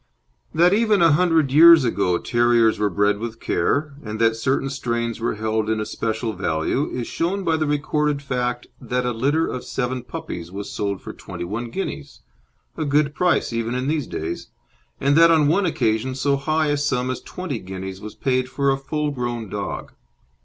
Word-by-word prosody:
That 175 +3 +4
even 215 -1 +3
a 165 - +6
hundred 160 -3 +3
years 165 +1 +8
ago 100 -7 +1
terriers 120 -1 +2
were 105 -1 +2
bred 100 +2 +1
with 115 0 -6
care, 140 - 0
and 110 -2 -5
that 115 0 +3
certain 130 +4 0
strains 120 -3 -2
were 115 - -1
held 110 0 -1
in 110 0 0
especial 110 +1 -2
value, 80 - -1
is 125 -2 -4
shown 190 +9 -2
by 165 -3 +2
the 155 -1 0
recorded 150 0 0
fact 125 -3 -2 0.2
that 125 0 -2
a 125 - 0
litter 140 +8 +1
of 125 - -4
seven 125 0 -2
puppies 85 -7 -7
was 100 +1 -6
sold 100 -2 -3
for - - -7
twenty - - -8
one 110 +7 -4
guineas 150 -2 -5 0.5
a - - -2
good 145 0 +2
price 180 -7 +1
even 115 +1 -2
in 130 +1 -2
these 150 -1 -1
days 80 +2 -5 0.5
and 140 +1 +2
that 165 0 +7
on 155 -3 +4
one 185 +5 +2
occasion 120 -3 0
so 140 +1 +1
high 155 +2 0
a 145 - +1
sum 130 -3 0
as 130 - -5
twenty 175 -10 -5
guineas 95 0 -7
was 105 0 -8
paid 130 -1 0
for 140 +1 +1
a 135 - -1
full 150 +2 -2
grown 120 -5 -4
dog. 100 0 -5
125 Hz, 190 wpm, -22 LUFS, 110-150 Hz, 0.5 s, years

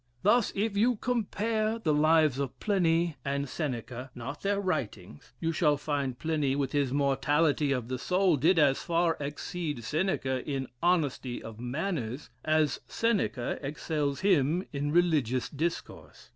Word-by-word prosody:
Thus, 225 +3 +4
if 205 +1 0
you 235 +4 +3
compare 220 -1 -1
the 165 -10 0
lives 155 -2 +4
of 140 -3 -4
Pliny 170 -5 +1
and 140 0 -1
Seneca 125 -3 -4
(not 135 +5 -6
their 200 0 0
writings,) 110 - -4
you 165 - 0
shall 150 -2 +2
find 140 -3 -2
Pliny, 150 -3 0
with 140 -2 -1
his 140 -3 +1
mortality 145 +2 +2
of 125 -4 -1
the 130 0 -3
soul, 180 +3 +2
did 165 +7 +3
as 145 -4 +4
far 170 -1 +1
exceed 145 -1 -4
Seneca 135 - -1
in 135 -3 -3
honesty 145 -8 0
of 110 -1 -9
manners, 130 - -3
as 155 -1 +2
Seneca 210 - 0
excels 145 0 -2
him 175 -2 +2
in 145 +1 -1
religious 150 -8 +2
discourse. 160 +4 -5
150 Hz, 145 wpm, -29 LUFS, 135-175 Hz, -, Thus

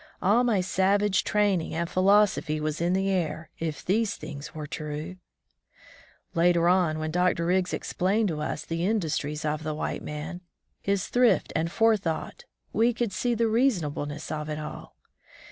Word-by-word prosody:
All 210 +6 +3
my 225 -6 +2
savage 195 +2 +2
training 200 -7 +1
and 170 +1 -1
philosophy 185 -4 +3
was 155 +1 -2
in 175 +1 +2
the 195 +1 +1
air, 160 -3 -2
if 160 -2 -4
these 215 +3 +1
things 150 -1 -8
were 155 -1 -5
true. 155 +4 -5 1.2
Later 170 0 +3
on, 175 -3 +3
when 155 0 -3
Dr. 180 0 +1
Riggs 180 +1 +1
explained 205 +4 0
to 155 -2 -3
us 150 - -3
the 165 +1 -2
industries 160 -7 -1
of 155 0 -1
the 155 -1 -3
white - - -3
man, 155 +4 -6 0.4
his 200 -1 0
thrift 245 -1 +3
and 165 +1 0
forethought, 220 - 0 0.3
we 235 +2 +3
could 235 -4 -1
see 240 +5 0
the 230 0 +2
reasonableness 160 - 0
of 155 0 -4
it 150 - -3
all. 155 0 -8
175 Hz, 160 wpm, -27 LUFS, 155-200 Hz, 1.2 s, All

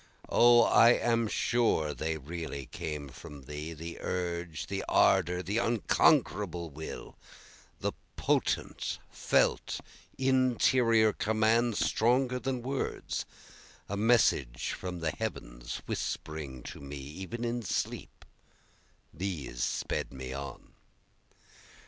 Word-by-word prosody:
O 120 0 +7
I 115 +1 +7
am 115 -1 +1
sure 110 -11 +1
they 80 +2 -2
really 80 -2 -6
came 75 +2 -5
from 70 +1 -11
Thee, 75 +4 -6
The 80 +2 -7
urge, 85 -3 -3
the 100 0 -3
ardor, 90 -1 +4
the 100 +6 0
unconquerable 100 -6 +2
will, 80 +3 -8 0.7
The - - 0 0.2
potent, - - 0
felt, - - +1 0.4
interior 125 -4 +4
command, 110 +2 +2
stronger 125 +2 +2
than 130 -2 -2
words, 135 +1 -3 0.6
A 100 - -3
message 100 - +2
from 90 -2 -5
the 80 -1 0
Heavens - - -5
whispering 70 -5 -4
to - - -8
me 70 0 -7
even 95 - -6
in 120 +1 -1
sleep, 105 - -3 0.9
These 80 -8 -3
sped - - -2
me 65 -1 -6
on. 70 +1 -7
90 Hz, 105 wpm, -30 LUFS, 75-115 Hz, 0.9 s, O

